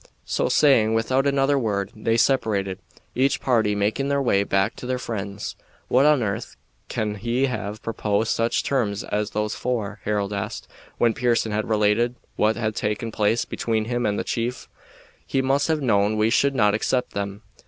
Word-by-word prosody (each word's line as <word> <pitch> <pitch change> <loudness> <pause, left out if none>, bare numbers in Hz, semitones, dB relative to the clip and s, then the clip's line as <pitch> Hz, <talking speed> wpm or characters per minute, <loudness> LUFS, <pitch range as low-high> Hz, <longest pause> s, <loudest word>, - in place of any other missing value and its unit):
So - - 0
saying, 115 -7 +4
without 130 +5 +1
another 140 0 +2
word, 100 -4 -1
they 115 +1 0
separated, 105 -8 +1 0.3
each 135 +2 +2
party 110 -5 +2
making 105 +7 0
their 140 0 +1
way 100 -7 +2
back 100 +2 +1
to 125 - -7
their 130 0 0
friends. 100 -4 -5 0.3
"What 135 +4 +4
on 150 -5 +4
earth 110 +2 -4 0.3
can 105 -1 -2
he 120 +5 0
have 110 -4 -4
proposed 110 -1 0
such 115 +1 +1
terms 110 -7 -1
as 105 0 -2
those 105 0 -2
for?" 110 -5 -3
Harold 105 -1 -1
asked, 100 +2 -4 0.3
when 115 -1 +3
Pearson 120 -2 +1
had 105 +1 -2
related 110 +3 +2 0.2
what 110 +1 +2
had 110 -2 -1
taken 105 +2 -2
place 110 +2 +1
between 110 -2 -1
him 120 0 -1
and 105 0 0
the - - -1
chief. 120 +1 -3 0.6
"He 135 - -1
must 135 +2 +2
have 155 -3 0
known 105 -3 +2
we 110 +1 +2
should 140 +3 +2
not 105 -4 +3
accept 125 +4 0
them." 100 +1 -4
110 Hz, 175 wpm, -23 LUFS, 105-125 Hz, 0.6 s, saying